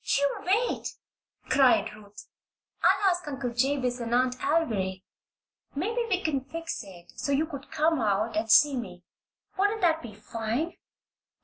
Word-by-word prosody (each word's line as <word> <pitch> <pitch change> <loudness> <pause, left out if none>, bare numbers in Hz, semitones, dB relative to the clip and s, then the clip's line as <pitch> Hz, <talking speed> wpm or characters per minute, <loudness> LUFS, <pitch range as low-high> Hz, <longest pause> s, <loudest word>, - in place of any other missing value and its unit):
"You 280 0 +1
wait!" 430 +7 0 0.5
cried 265 -3 +4
Ruth. 205 -1 -13 0.6
"I'll 390 -2 +4
ask 355 -2 -3
Uncle 265 -4 -3
Jabez 255 0 0
and 235 0 -1
Aunt 250 0 +3
Alviry. 210 - 0 0.7
Maybe 440 +11 -1
we 375 -2 0
can 280 -5 0
fix 330 0 -5
it 175 -3 -14
so 280 - -3
you 285 +3 +2
could 285 -3 -9
come 315 -2 +1
out 215 +1 0
and 220 +1 -1
see 290 +4 +6
me. 180 -8 -6 0.6
Wouldn't 410 +2 +2
that 325 -3 +3
be 220 -4 -9
fine?" 230 +9 -3
270 Hz, 145 wpm, -28 LUFS, 225-320 Hz, 0.7 s, see